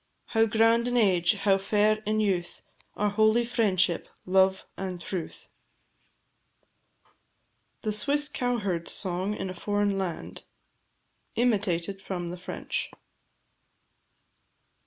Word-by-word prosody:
How 225 -1 +4
grand 225 +2 +3
in 245 0 0
age, 190 -3 +3
how 195 -1 +2
fair 210 +2 +2
in 215 0 +1
youth, 185 -4 -1 0.3
Are 210 0 0
holy 220 +3 +3
"Friendship, 190 -7 +1 0.2
Love, 190 +1 +3
and 185 -2 -5
Truth!" 175 -1 -6 2.4
THE 215 - 0
SWISS 290 +7 +3
COWHERD'S 205 -9 -1
SONG 190 +2 -1
IN 190 - -4
A - - -6
FOREIGN 205 +2 0
LAND. 180 -4 -5 0.9
IMITATED 195 -5 0
FROM 175 -3 -4
THE 180 - -6
FRENCH. - - -4
200 Hz, 105 wpm, -27 LUFS, 185-220 Hz, 2.4 s, How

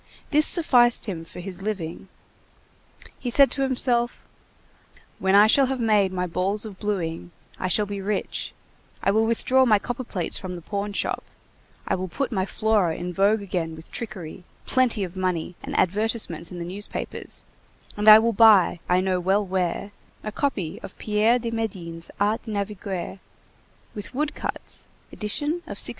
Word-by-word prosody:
This 305 0 +5
sufficed 245 -8 +4
him 180 -6 -4
for 165 - -10
his 190 0 -5
living. 190 -4 -4 1.1
He 250 - -3
said 275 +3 +5
to 275 - -1
himself: 245 -2 +1 1.0
"When 190 +1 +2
I 205 +1 +8
shall 265 +5 +5
have 265 0 -2
made 210 -4 +3
my 180 -1 -1
balls 190 +5 -1
of 200 -3 -9
blueing, 175 -5 -3 0.3
I 185 - -1
shall 210 +3 +3
be 200 -1 -5
rich, 200 +1 -2 0.5
I 195 - +3
will 220 +2 +2
withdraw 255 +3 +3
my 220 -5 +5
copperplates 225 -5 -3
from 185 -1 -6
the 175 - -8
pawn 205 +2 -3
shop, - - -1 0.6
I - - +1
will 185 0 -2
put 265 +10 -3
my 190 -3 -1
Flora 210 -8 +1
in 180 0 -5
vogue 200 +3 +2
again 170 -4 -3
with 160 +1 -12
trickery, 185 -7 -6 0.2
plenty 250 -5 +2
of 180 0 -6
money 180 -2 -2
and - - -5
advertisements 200 -4 0
in 180 - -7
the 170 - -5
newspapers 195 +4 -5 0.5
and 210 +1 -2
I 215 0 +12
will 230 +1 +2
buy, 205 -5 +6
I 180 +1 +4
know 185 -1 0
well 195 +3 +1
where, 185 +1 -2 0.3
a 215 - -4
copy 205 - -2
of - - -10
Pierre 215 +3 +2
de 235 -1 -4
Médine's 180 -7 -4
Art 210 +2 +1
de 225 - -8
Naviguer, 200 -2 -4 0.7
with 210 +4 -7
wood 295 +2 -1
cuts, - - -4 0.2
edition 215 +7 -3 0.2
of - - -6
1655." - - +3
205 Hz, 170 wpm, -24 LUFS, 185-225 Hz, 1.1 s, I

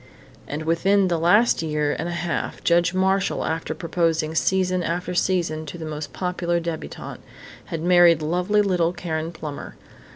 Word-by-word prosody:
And 150 +2 -4
within 185 +4 +2
the 170 -2 0
last 205 +8 +4
year 150 -2 -1
and 170 - -2
a 170 0 -3
half 170 - -3
Judge 175 +1 +3
Marshall, 190 +1 +1
after 160 0 -3
proposing 165 -1 0
season 185 +2 +1
after 175 +1 -2
season 175 -4 0
to 160 - -7
the 160 - -6
most 155 -1 -5
popular 180 -1 -1
debutante, 165 -1 -6 0.4
had 165 -1 -5
married 175 -3 +5
lovely 180 +6 +1
little 180 -3 +1
Karen 165 -2 -3
Plummer. 155 -3 -7
170 Hz, 155 wpm, -23 LUFS, 160-180 Hz, 0.4 s, married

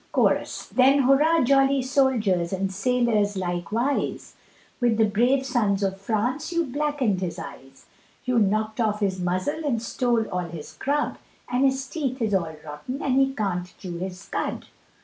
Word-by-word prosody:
CHORUS. - - +1
Then 270 +2 +4
hurrah 295 +5 +4
jolly 270 +1 +3
soldiers 235 -10 +1
and 190 0 -2
sailors 215 -2 +1
likewise, 190 +9 -2 0.5
With 240 -3 +2
the 220 - +5
brave 245 +6 +2
sons 210 -6 +1
of 195 0 -2
France 240 - -1
you 335 -1 +1
blackened 275 -7 -1
his 180 -3 -3
eyes, 135 -1 -10 0.4
You 250 -2 +2
knock'd 215 +2 +1
off 215 -1 0
his 190 -2 0
muzzle 185 - -1
and 265 -6 0
stole 235 0 0
all 180 - -2
his 170 -3 -7
grub, 290 +2 -1 0.3
And 250 +2 +2
his 265 0 +1
teeth 275 -6 -3
is 220 -3 0
all 170 -4 0
rotten 150 - -6
and 265 - +1
he 270 0 +3
can't 180 -4 -2
chew 175 -3 -6
his 185 +1 -6
cud. - - -3
225 Hz, 160 wpm, -25 LUFS, 190-270 Hz, 0.5 s, the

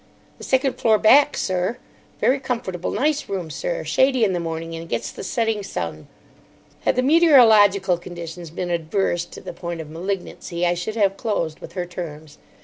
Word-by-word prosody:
"The - - -10
second 265 0 +1
floor 220 -2 +4
back, 280 +7 +5
sir. 185 +5 -1 0.4
Very 270 +2 +2
comfortable, 230 -9 -3
nice 295 +6 0
room, 180 -5 -4
sir. - - -3
Shady 260 -2 +2
in 195 -3 +2
the 175 - -1
morning, 165 0 -4
and 165 0 -8
gets - - -2
the - - -8
setting 225 +1 -1
sun." 85 - -5 0.8
Had - - +3
the 255 - +1
meteorological 220 - +5
conditions 170 -1 -8
been 175 +2 -4
adverse 175 +1 0
to - - -12
the - - -7
point 170 -1 -6
of 155 -1 -8
malignancy, 175 0 -4
I 175 - +3
should 175 +5 -4
have 200 -3 +2
closed 170 -8 -2
with - - -11
her 180 -2 -3
terms. 155 -4 -8
185 Hz, 175 wpm, -22 LUFS, 170-230 Hz, 0.8 s, back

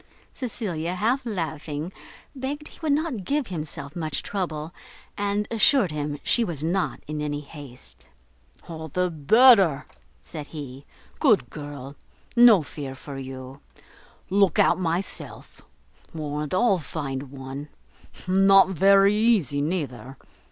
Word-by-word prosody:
Cecilia, 185 - -3
half 240 +8 +1
laughing, 160 -4 -4 0.4
begged 285 +3 -5
he - - -16
would 315 -2 0
not 285 - 0
give 285 +6 0
himself 155 -6 -5
much 155 -4 -2
trouble, 165 -5 -4 0.4
and 205 0 -1
assured 225 - +3
him 145 -1 -3
she 240 - +2
was 165 -8 -3
not 180 +4 -1
in 150 0 -4
any 145 -1 -2
haste. 140 -4 -10 0.6
"All 160 -2 -7
the 180 +4 -1
better," 190 - +5 0.4
said 150 -2 -8
he, 140 -3 -9 0.3
"good 230 -10 +3
girl; 145 -2 -8 0.4
no 235 -7 +7
fear 145 -2 -7
for 135 +1 -8
you: 130 0 -8 0.7
look 195 -3 +3
out - - +4
myself; 175 +1 -4 0.5
warrant 150 +1 -3
I'll 200 -3 +3
find 135 -2 -5
one. 135 +2 -7 0.6
Not 195 0 +6
very 195 +2 +5
easy, 210 - +2
neither! 135 -6 -3
165 Hz, 125 wpm, -25 LUFS, 145-200 Hz, 0.7 s, no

